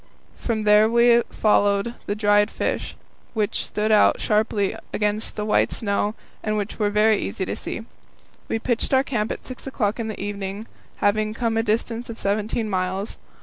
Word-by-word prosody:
From 220 Hz, -3 st, -1 dB
there 210 Hz, +1 st, +5 dB
we 235 Hz, 0 st, +5 dB
followed 205 Hz, +1 st, +2 dB
the 205 Hz, -, -1 dB
dried 205 Hz, -1 st, +3 dB
fish, -, -, -3 dB, 0.4 s
which 210 Hz, -2 st, -1 dB
stood 215 Hz, +1 st, -1 dB
out 210 Hz, -, +5 dB
sharply 210 Hz, -2 st, +1 dB, 0.2 s
against 210 Hz, +1 st, -1 dB
the 210 Hz, -, -3 dB
white 210 Hz, -, +2 dB
snow 205 Hz, 0 st, 0 dB, 0.3 s
and 215 Hz, 0 st, -1 dB
were 210 Hz, 0 st, -1 dB
very 210 Hz, +1 st, +3 dB
easy 190 Hz, -, -3 dB
to -, -, -3 dB
see. 225 Hz, -, -5 dB, 0.6 s
We -, -, -1 dB
pitched 240 Hz, +3 st, 0 dB
our 265 Hz, -, +4 dB
camp 225 Hz, -6 st, -2 dB
at -, -, -6 dB
six 255 Hz, +1 st, -9 dB
o'clock 225 Hz, -4 st, -1 dB
in 225 Hz, -, -2 dB
the 215 Hz, -, -6 dB
evening, 200 Hz, +1 st, -4 dB, 0.4 s
having 215 Hz, +1 st, +1 dB
come 230 Hz, -2 st, 0 dB
a 225 Hz, -, +3 dB
distance 230 Hz, +2 st, -1 dB
of 225 Hz, -, -6 dB
seventeen 215 Hz, +2 st, -1 dB
miles. 190 Hz, +1 st, -2 dB
215 Hz, 170 wpm, -23 LUFS, 205-225 Hz, 0.6 s, there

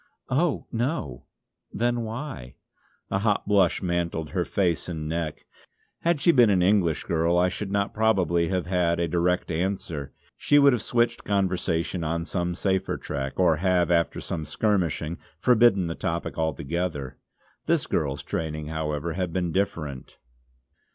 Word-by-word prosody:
"Oh 155 Hz, +3 st, +1 dB
no!" 115 Hz, -, -2 dB, 0.5 s
"Then 120 Hz, +1 st, 0 dB
why?" 115 Hz, -, -6 dB, 0.6 s
A 95 Hz, -, +1 dB
hot 105 Hz, 0 st, +1 dB
blush 100 Hz, -3 st, +3 dB
mantled 85 Hz, -4 st, -2 dB
her -, -, 0 dB
face 90 Hz, -4 st, 0 dB
and 80 Hz, -3 st, -4 dB
neck. 80 Hz, -1 st, -3 dB, 0.5 s
Had 170 Hz, -2 st, +1 dB
she 170 Hz, -, +5 dB
been 120 Hz, -7 st, +5 dB
an 95 Hz, -3 st, +3 dB
English 90 Hz, -4 st, +2 dB
girl 85 Hz, +1 st, +1 dB
I 90 Hz, +1 st, +4 dB
should 95 Hz, +2 st, -4 dB
not 100 Hz, 0 st, 0 dB
probably 90 Hz, -7 st, +2 dB
have 90 Hz, -1 st, -1 dB
had 85 Hz, -2 st, +1 dB
a 85 Hz, -, +1 dB
direct 90 Hz, +2 st, 0 dB
answer; 80 Hz, -5 st, -2 dB, 0.2 s
she 145 Hz, -, +3 dB
would 140 Hz, -2 st, +6 dB
have 120 Hz, -, 0 dB
switched 120 Hz, 0 st, 0 dB
conversation 90 Hz, -3 st, 0 dB
on 85 Hz, +1 st, -2 dB
some 90 Hz, -1 st, -2 dB
safer 95 Hz, +1 st, 0 dB
track, 70 Hz, +1 st, -5 dB
or 85 Hz, -4 st, +4 dB
have, 90 Hz, 0 st, +2 dB
after 85 Hz, -1 st, +2 dB
some 80 Hz, -2 st, -4 dB
skirmishing, 85 Hz, -4 st, -1 dB, 0.2 s
forbidden 115 Hz, -2 st, +4 dB
the 85 Hz, -, -2 dB
topic 85 Hz, +1 st, -3 dB
altogether. 80 Hz, -3 st, -2 dB, 0.5 s
This -, -, +2 dB
girl's 70 Hz, -2 st, -1 dB
training, 75 Hz, -2 st, -4 dB
however, 80 Hz, 0 st, -2 dB
had 90 Hz, 0 st, -2 dB
been 90 Hz, -1 st, -1 dB
different. 80 Hz, -8 st, -3 dB
90 Hz, 150 wpm, -26 LUFS, 80-100 Hz, 0.6 s, would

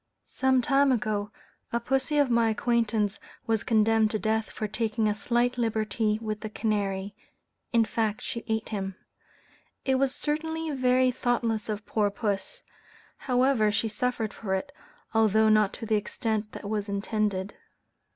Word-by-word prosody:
Some 260 Hz, -1 st, +2 dB
time 275 Hz, 0 st, +4 dB
ago, 215 Hz, -4 st, 0 dB, 0.4 s
a 235 Hz, -, +1 dB
pussy 270 Hz, +4 st, 0 dB
of 285 Hz, -4 st, +3 dB
my 235 Hz, -1 st, +4 dB
acquaintance 220 Hz, -2 st, 0 dB, 0.3 s
was 225 Hz, -2 st, +1 dB
condemned 220 Hz, -1 st, +3 dB
to 215 Hz, -, -1 dB
death 220 Hz, +1 st, 0 dB
for 215 Hz, -, -4 dB
taking 220 Hz, +1 st, 0 dB
a 210 Hz, -, +2 dB
slight 240 Hz, +3 st, 0 dB
liberty 215 Hz, -1 st, 0 dB
with 215 Hz, -1 st, -3 dB
the 215 Hz, -, -5 dB
canary 200 Hz, -2 st, -1 dB, 0.6 s
in 230 Hz, -2 st, +4 dB
fact, 220 Hz, -1 st, -1 dB
she 235 Hz, -, -4 dB
ate 220 Hz, 0 st, -1 dB
him. 195 Hz, -3 st, -3 dB, 0.9 s
It 265 Hz, -1 st, +2 dB
was 275 Hz, -1 st, +2 dB
certainly 320 Hz, +2 st, -2 dB
very 255 Hz, -1 st, +3 dB
thoughtless 235 Hz, -3 st, -1 dB
of 210 Hz, 0 st, -3 dB
poor 210 Hz, -2 st, +1 dB
puss; 200 Hz, -2 st, -3 dB, 0.5 s
however 250 Hz, -4 st, +2 dB
she 225 Hz, +2 st, 0 dB
suffered 225 Hz, -1 st, -2 dB
for 190 Hz, -3 st, -2 dB
it, 280 Hz, +9 st, -4 dB, 0.4 s
although 220 Hz, -1 st, +4 dB
not 215 Hz, -2 st, +4 dB
to -, -, -6 dB
the 220 Hz, -1 st, +2 dB
extent 215 Hz, 0 st, -2 dB
that 200 Hz, -, -7 dB
was 210 Hz, -1 st, -2 dB
intended. 200 Hz, -1 st, -1 dB
220 Hz, 150 wpm, -27 LUFS, 210-245 Hz, 0.9 s, time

